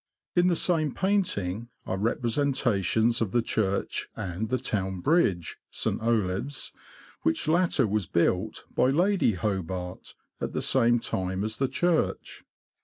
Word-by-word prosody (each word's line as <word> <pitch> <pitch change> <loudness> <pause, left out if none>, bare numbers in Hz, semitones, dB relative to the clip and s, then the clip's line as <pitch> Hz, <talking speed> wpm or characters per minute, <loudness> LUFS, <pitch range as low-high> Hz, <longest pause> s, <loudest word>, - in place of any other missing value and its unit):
In 175 0 +4
the 175 - +3
same 160 -5 +1
painting 120 - 0 0.2
are - - -2
representations 115 -1 +1
of 110 -5 0
the 120 -1 +3
church 100 -4 -1
and 95 +5 -4
the 130 - +1
town 95 -7 -2
bridge 100 - +1
(St. - - -2
Olave's), 115 +4 -1 0.5
which 80 - 0
latter 165 -5 +3
was 105 -4 -1
built, 90 +5 0
by 125 - +3
Lady 180 - +3
Hobart, 95 -2 -4 0.2
at - - -3
the - - -1
same 120 -2 +3
time 95 -2 -2
as 110 +1 -4
the 135 - +2
church. 175 +4 -1
115 Hz, 135 wpm, -27 LUFS, 95-140 Hz, 0.5 s, In